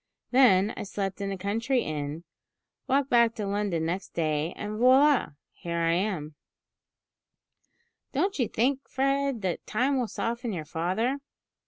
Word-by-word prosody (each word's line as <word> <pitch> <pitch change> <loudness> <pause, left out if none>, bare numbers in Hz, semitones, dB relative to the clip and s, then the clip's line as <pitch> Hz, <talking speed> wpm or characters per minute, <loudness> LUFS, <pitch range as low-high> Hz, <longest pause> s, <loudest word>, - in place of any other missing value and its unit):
Then 220 -6 +5
I - - -6
slept 195 -1 -4
in 200 0 -2
a 195 - -3
country 230 +7 0
inn, 150 +1 -4 0.6
walked 275 +1 +1
back 235 -1 +4
to 210 - -3
London 200 -5 -1
next 180 +3 -4
day, 155 0 0
and, 210 +1 -5
voila! 260 - +5 0.2
here 170 -1 -5
I 165 0 +2
am!" 175 -5 -1 1.8
"Don't 360 +5 0
you 245 - +2
think, 265 +4 0
Fred, 275 -3 0
that 180 -2 -3
time 260 +5 +1
will 245 - 0
soften 235 +1 -3
your 160 -4 -4
father?" 190 - -1
210 Hz, 145 wpm, -27 LUFS, 175-255 Hz, 1.8 s, Then